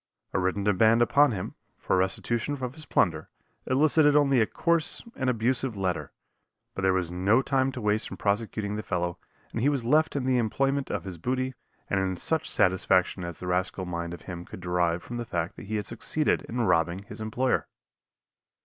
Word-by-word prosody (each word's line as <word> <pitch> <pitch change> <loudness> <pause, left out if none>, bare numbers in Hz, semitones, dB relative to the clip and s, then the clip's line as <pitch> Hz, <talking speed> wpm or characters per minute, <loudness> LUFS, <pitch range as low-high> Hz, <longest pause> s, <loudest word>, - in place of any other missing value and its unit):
A - - +1
written 95 +2 0
demand 110 +4 +4
upon 140 +4 +4
him, 95 -5 -4 0.2
for - - 0
restitution 110 +8 0
of 125 0 -3
his 155 +1 -9
plunder, 80 -5 +1 0.4
elicited 145 +2 +4
only 140 -4 +4
a 110 - +3
coarse 170 +1 0
and 130 -1 0
abusive 120 0 0
letter, 95 -2 -2 0.6
but - - -4
there 95 0 +3
was 90 -2 0
no 100 +8 +3
time 135 -1 +1
to 125 - -5
waste 105 +1 0
in - - -7
prosecuting 105 0 -1
the - - -2
fellow 90 -4 -2 0.3
and 115 - -3
he 140 - +4
was 135 -5 -1
left 155 +5 +3
in 135 -3 -1
the 130 -1 +3
enjoyment 135 +5 0
of - - -2
his 90 -3 -7
booty 130 +5 -1 0.3
and 95 - +1
in 95 -1 -1
such 160 - +1
satisfaction 95 0 +2
as 85 -2 -6
the - - -7
rascal 90 +1 -1
mind 85 -1 -4
of - - -15
him 85 -1 -7
could - - -10
derive 90 -1 0
from 120 - -6
the 120 - -2
fact 85 -7 -3
that - - -10
he 110 - -3
had 105 -1 -2
succeeded 135 +8 0
in 120 +1 -1
robbing 90 -2 +1
his 105 +2 -10
employer. 125 +4 0
110 Hz, 195 wpm, -27 LUFS, 90-130 Hz, 0.6 s, demand